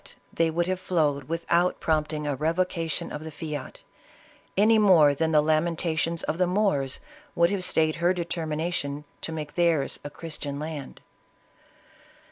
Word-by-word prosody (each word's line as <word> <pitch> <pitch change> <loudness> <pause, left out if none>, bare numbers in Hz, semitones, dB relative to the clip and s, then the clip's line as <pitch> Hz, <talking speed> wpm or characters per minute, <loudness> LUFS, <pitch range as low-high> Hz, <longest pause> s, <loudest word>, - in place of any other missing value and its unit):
they 165 0 +2
would 170 +2 0
have 185 +1 -1
flowed 150 -7 0
without 170 +3 +1
prompting 155 -1 0
a 145 -1 -1
revoca 165 +3 -1
tion - - -3
of 150 - -6
the 160 - -6
fiat, 150 -3 -6 0.7
any 220 +2 +5
more 170 -9 +6
than 160 +3 0
the 150 -1 +4
lamentations 165 +1 0
of 160 - -2
the 180 - +3
Moors 180 -9 0 0.4
would 170 +2 +4
have 195 -2 -1
stayed 160 -3 +1
her 170 +1 +3
determination 160 -4 -2 0.2
to - - -4
make 150 -2 -5
theirs 165 -5 +1
a 145 - -5
Christian 145 -2 -6
land. 150 -2 -6
160 Hz, 150 wpm, -26 LUFS, 150-175 Hz, 0.7 s, more